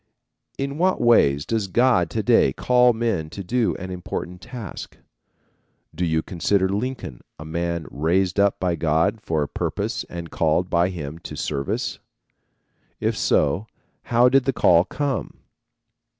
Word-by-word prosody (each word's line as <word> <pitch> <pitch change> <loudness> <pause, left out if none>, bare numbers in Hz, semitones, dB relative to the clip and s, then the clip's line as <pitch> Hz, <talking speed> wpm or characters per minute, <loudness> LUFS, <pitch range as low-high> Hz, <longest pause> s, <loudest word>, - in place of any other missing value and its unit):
In 140 +2 -3
what 185 +1 +2
ways 75 -12 +4
does 110 -3 -1
God 115 -5 +3
to - - -2
day 65 - +4
call 125 - +4
men 110 -9 -1
to 100 +4 -7
do 120 +5 0
an 95 0 -7
important 90 0 -6
task? 120 -6 -8 1.0
Do 85 +3 -3
you 80 -1 0
consider 95 +2 +1
Lincoln 105 - -4 0.2
a 75 - -9
man 85 0 -2
raised 90 +6 +1
up 100 0 +3
by 90 -2 0
God 80 +7 +1
for 80 -6 -1
a - - -3
purpose - - -3
and 85 -1 -7
called 85 +3 +1
by 85 +1 +3
him 80 -3 -6
to - - -8
service? 70 -2 -3 1.0
If - - 0
so, 75 +9 +1 0.4
how 120 +1 +4
did 135 0 +3
the 135 - +1
call 85 -5 +4
come? 145 -2 -3
90 Hz, 150 wpm, -23 LUFS, 80-115 Hz, 1.0 s, ways